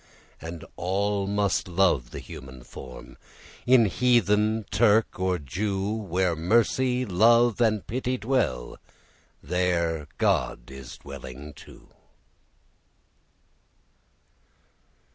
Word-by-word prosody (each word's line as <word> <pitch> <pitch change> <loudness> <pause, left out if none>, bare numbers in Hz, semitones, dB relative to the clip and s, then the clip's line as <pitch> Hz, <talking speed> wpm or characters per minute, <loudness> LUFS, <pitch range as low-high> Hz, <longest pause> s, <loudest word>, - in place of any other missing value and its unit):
And 80 0 -7
all 100 +2 0
must 100 -1 0
love 85 -9 +2
the - - -8
human 65 -1 -10
form, 65 0 -11 0.5
In 125 -2 +6
heathen, 110 -1 +2
Turk, 110 0 +3
or 95 -1 +1
Jew. 95 +7 -2
Where 95 -5 0
Mercy, 120 +8 +2
Love, 115 +4 +4
and 110 -4 +2
Pity 130 +2 -2
dwell, 110 - -1 0.6
There 85 -4 0
God - - 0
is 65 -2 -10
dwelling 70 +1 -9
too. - - -15
95 Hz, 90 wpm, -26 LUFS, 80-110 Hz, 0.6 s, In